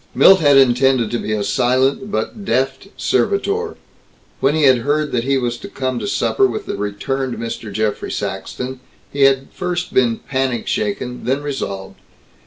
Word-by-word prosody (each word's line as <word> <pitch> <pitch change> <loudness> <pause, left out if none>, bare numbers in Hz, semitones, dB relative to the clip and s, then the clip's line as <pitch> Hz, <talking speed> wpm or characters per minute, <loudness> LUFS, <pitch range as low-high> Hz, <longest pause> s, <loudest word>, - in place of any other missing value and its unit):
Milt 190 0 +7
had 145 -4 +5
intended 130 -2 +4
to 120 - -1
be 110 - -4
a 105 -1 0
silent 130 - +1
but 210 0 -3
deft 135 +1 -1
servitor. 420 +2 0 0.6
When 140 +3 +2
he 160 - +1
had 130 -3 +6
heard 145 +4 0
that 120 -1 -1
he 135 0 +2
was 120 -2 -1
to 200 - -8
come 130 -9 -3
to - - -4
supper 115 +3 +2
with 120 - -5
the - - -4
returned 120 +6 -3
Mr. 115 -2 -5
Geoffrey 110 +1 -2
Saxton, 130 +1 -4 0.3
he 140 -1 +4
had 135 0 +2
first 180 -1 -3
been 120 -3 +3
panic 130 -3 -2
shaken, 125 +4 -3
then 135 +3 0
resolved. 100 -9 -5
130 Hz, 170 wpm, -19 LUFS, 115-140 Hz, 0.6 s, Milt